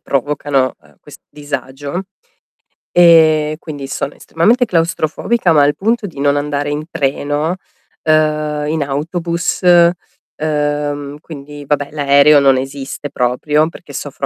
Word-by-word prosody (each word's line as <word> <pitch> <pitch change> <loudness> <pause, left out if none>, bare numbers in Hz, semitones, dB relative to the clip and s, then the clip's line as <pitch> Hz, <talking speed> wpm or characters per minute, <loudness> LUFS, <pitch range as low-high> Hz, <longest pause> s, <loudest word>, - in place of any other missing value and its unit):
provocano, 140 -1 -1
uhm, 75 -1 -24
questo - - -15
disagio 145 +2 -5 0.9
e 160 -3 +5
quindi 145 -5 -7
sono 140 +1 -4
estremamente 225 +10 +1
claustrofobica, 170 +2 0
ma 145 - +5
al 145 +1 +2
punto 225 +2 0
di 160 -6 -11
non 140 0 +2
andare 145 0 -2
in 150 +1 -3
treno, 145 +4 -1 0.5
uhm, 155 -1 +1
in 160 -1 0
autobus, 170 +5 -2
uhm, 150 -4 0
quindi, 145 -2 -10
vabbè, 145 0 -1
l'aereo 145 0 +5
non 135 -1 +4
esiste 135 +2 -5
proprio, 150 +6 0
perché - - -13
soffro - - -5
150 Hz, 120 wpm, -16 LUFS, 140-160 Hz, 0.9 s, e